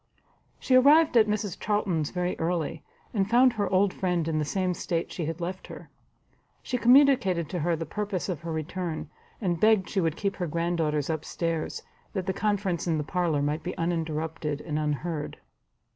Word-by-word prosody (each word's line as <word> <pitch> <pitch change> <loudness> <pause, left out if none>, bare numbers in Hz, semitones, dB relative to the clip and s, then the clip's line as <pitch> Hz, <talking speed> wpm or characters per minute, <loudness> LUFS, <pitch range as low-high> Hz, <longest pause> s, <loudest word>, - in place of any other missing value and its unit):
She 260 - 0
arrived 290 +4 +6
at 220 -2 +6
Mrs 210 -3 -2
Charlton's 190 -8 0
very 180 0 -2
early, 165 -2 -2 0.3
and 200 -3 0
found 245 +2 +5
her 205 -4 -1
old 190 0 +3
friend 175 -3 -1
in 155 -1 0
the 150 - 0
same 185 +3 0
state 170 0 -3
she 170 - -3
had 165 +1 -4
left 180 +2 -5
her. - - -11 0.7
She 250 - -2
communicated 245 - +5
to 180 - -3
her 165 +2 +1
the 165 +1 -4
purpose 200 +2 -3
of 175 -6 -3
her 170 0 -5
return, 160 0 -4 0.3
and 175 -6 -1
begged 215 -2 +4
she 195 - 0
would 165 -2 0
keep 200 -1 -2
her 180 - -2
granddaughters 160 -2 0
up 155 -1 -3
stairs, 165 -2 -3 0.3
that 190 -4 -2
the 190 - -1
conference 200 -4 -1
in 165 -2 +1
the 150 - -1
parlour 165 -3 0
might 150 +2 -1
be 180 - -5
uninterrupted 160 -3 -2
and 150 -2 -3
unheard. 150 +1 -3
175 Hz, 185 wpm, -27 LUFS, 160-200 Hz, 0.7 s, arrived